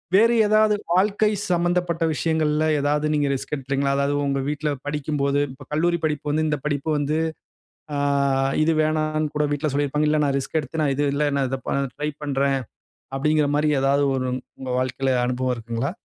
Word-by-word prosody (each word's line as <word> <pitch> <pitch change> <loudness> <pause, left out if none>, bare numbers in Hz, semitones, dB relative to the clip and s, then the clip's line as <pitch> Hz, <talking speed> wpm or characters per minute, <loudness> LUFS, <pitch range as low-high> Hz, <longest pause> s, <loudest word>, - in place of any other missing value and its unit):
வேறு 230 +3 +5
ஏதாவது 215 0 +4 0.2
வாழ்க்கை 205 +3 +3 0.2
சம்பந்தப்பட்ட 175 -1 +1
விஷயங்கள்ல 155 -1 +1
எதாவது 145 +1 +1
நீங்க 145 -1 +1
ரிஸ்க் 135 +2 -5
எடுத்துருக்கீங்களா? 140 0 -1
அதாவது 140 +1 +1
உங்க 140 -1 0
வீட்டுல 150 0 -2 0.2
படிக்கும்போது 145 -1 -1
இப்போ 140 0 -13
கல்லூரி 170 +3 +1
படிப்பு 150 -1 -1
வந்து 155 +2 +1
இந்த 150 -1 0
படிப்பு 145 +1 -1
வந்து 145 +2 0 0.8
அ - - -1 0.7
இது 165 +1 +3
வேணாம்ன்னு 155 0 0
கூட 150 0 +2
வீட்டுல 145 0 -1
சொல்லியிருப்பாங்க. 145 +1 +1
இல்ல 155 - +2
நான் 140 -1 +1
ரிஸ்க் 160 +4 -2
எடுத்து 150 +4 -4
நான் 140 -2 +2
இது 145 +1 +1
இல்ல 145 +1 +1
நான் 135 - +1
இத 135 - -2
ப - - -1 0.3
ட்ரைப் 150 0 -4
பண்றேன். 135 -1 +1 0.6
அப்படின்ற 150 +2 +2
மாரி 150 +1 +2
எதாவது 140 +1 +3
ஒரு 130 -1 -1 0.3
உங்க 130 -1 -6
வாழ்க்கைல 130 +1 0
அனுபவம் 125 0 0
இருக்குங்களா? 115 +5 -3
150 Hz, 170 wpm, -23 LUFS, 140-155 Hz, 0.8 s, வேறு